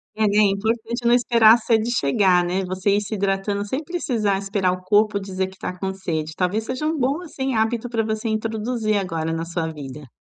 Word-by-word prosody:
É, 220 - 0
e 205 0 +2
é - - +6
importante 225 +4 -1
não 240 - +5
esperar 230 -2 +6
a - - +1
sede 225 0 +1
chegar, 180 - +3
né. 185 +2 -1
Você 185 +2 -1
ir 205 - +1
se 210 +1 -4
hidratando 200 +1 -1
sem 265 +9 -3
precisar 240 - -1
esperar 195 -1 0
o 185 0 -4
corpo 205 +1 +3
dizer 190 -1 -3
que 190 - -14
tá 180 - -5
com 190 +1 -2
sede. 160 -5 -3
Talvez 200 +5 -1
sejam 300 +4 -2
um 320 - -3
bom, 275 +6 0
assim, 270 -6 -3
hábito 225 +2 0
pra 225 -1 0
você 220 +1 -2
introduzir 220 0 -1
agora 165 -4 -2
na 165 - -2
sua 165 -1 -3
vida. 145 -1 -9
205 Hz, 215 wpm, -22 LUFS, 185-225 Hz, -, é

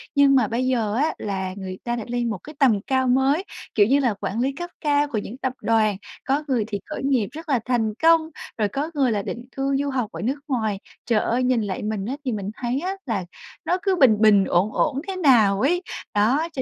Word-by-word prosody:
nhưng 280 -1 +5
mà 250 -5 +4
bây 245 +4 -1
giờ 230 -5 0
á 300 +6 +1
là 190 -2 -3
người 185 -1 -6
ta 240 0 -1
đã 235 - -4
lên 240 -1 -1
một 215 - -2
cái 300 0 -11
tầm 235 -8 +4
cao 260 +3 0
mới, 265 +7 +2 0.3
kiểu 205 - +6
như 275 +3 +4
là 250 -5 +1
quản 205 +2 -4
lý 265 +3 +1
cấp 350 +1 -6
cao 290 -1 +2
của 265 -6 -3
những 215 +4 -5
tập 260 -1 -2
đoàn, 215 -3 +2 0.3
có 280 +3 +1
người 250 -5 +1
thì 205 -3 -3
khởi 305 - -6
nghiệp 260 -7 +1
rất 320 +3 -9
là 265 -4 +3
thành 230 -4 0
công, 325 -1 +5 0.3
rồi 215 -2 +1
có 280 +10 -3
người 270 -5 +2
là 210 -2 0
định 235 +4 -6
cư 275 0 0
du 285 - -1
học 250 -5 -2
ở - - -7
nước 265 +6 -1
ngoài. 220 -7 -1 0.3
Trời 230 -3 +2
ơi, 245 +2 0
nhìn 250 -2 +2
lại 200 -2 -3
mình 210 -2 -2
á, 255 +5 -3
thì 255 - 0
mình 205 -3 -3
thấy 250 +2 -1
á 370 +4 -2
là 210 -8 -2 0.4
nó 360 - +1
cứ 390 -2 +2
bình 260 -10 +5
bình, 205 -3 +6
ổn 190 +5 +1
ổn 280 -2 0
thế 385 - -3
nào 225 - +4
ấy. 350 +7 +2 0.3
Đó, 250 +11 +2
cho 265 - -2
250 Hz, 245 wpm, -23 LUFS, 215-280 Hz, 0.4 s, kiểu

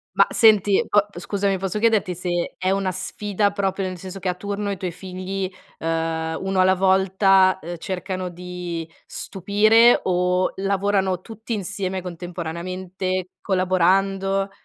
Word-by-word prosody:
Mah - - +5
senti, 210 -3 +5
po 205 -1 +4
scusami 195 +1 -1
posso 195 +2 -2
chiederti 215 -4 +2
se 175 0 -2
è 185 - -1
una 195 -1 0
sfida, 200 +2 -1
proprio 195 -1 -1
nel 185 -1 -5
senso 190 +2 -8
che 185 - -4
a 180 - +1
turno 200 +2 -4
i 200 - -1
tuoi 185 -1 -4
figli, 185 +1 -5 0.3
uhm, 160 0 -1
uno 190 0 -1
alla 185 0 +5
volta, 190 0 +4
ehm, 175 +1 -6
cercano 185 +1 -4
di 175 -1 -6 0.2
stupire 215 +4 +3
o 180 0 +1
lavorano 195 -1 0
tutti 225 +2 -7
insieme 190 -2 -3
contemporaneamente, 180 +1 -4
collaborando? 195 +1 +1
190 Hz, 135 wpm, -22 LUFS, 180-195 Hz, 0.3 s, Mah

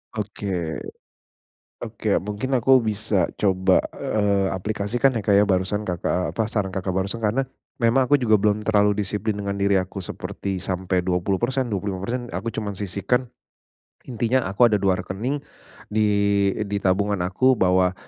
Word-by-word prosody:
Oke. 95 -6 -3 1.0
Oke, - - -1
mungkin 105 +6 -4
aku 130 +1 +5
bisa 105 -4 0
coba, 95 -2 +3 0.2
eee, 100 -2 0
aplikasikan 110 +7 0
ya 110 - -2
Kak 100 - +1
ya, 100 +1 +6
barusan 100 +2 0
Kakak 90 +1 -1
apa, 110 - +1
saran 95 -4 -2
Kakak 95 0 -2
barusan. 100 +5 -2
Karena 125 +5 +1 0.3
memang 120 +3 +3
aku 145 +3 +3
juga 110 -4 +4
belum 105 +1 +1
terlalu 105 -1 +3
disiplin 105 +2 -1
dengan 100 -1 -3
diri 100 -1 +2
aku 95 +1 -5
seperti 95 +2 -5
sampai 95 0 -1
20%, 100 +8 0
25% 100 +5 -3
aku 115 +5 -3
cuma 105 -3 -4
sisihkan, 105 +6 -1 0.8
intinya 120 +2 +1
aku 100 +5 +4
ada 105 -4 +2
2 95 -2 +2
rekening, 110 +10 -3 0.6
di 110 - +2 0.6
eee, 105 - -2
di 100 0 -3
tabungan 100 +1 +1
aku 95 +9 +3
bahwa 95 -3 +2
100 Hz, 150 wpm, -23 LUFS, 95-110 Hz, 1.0 s, ya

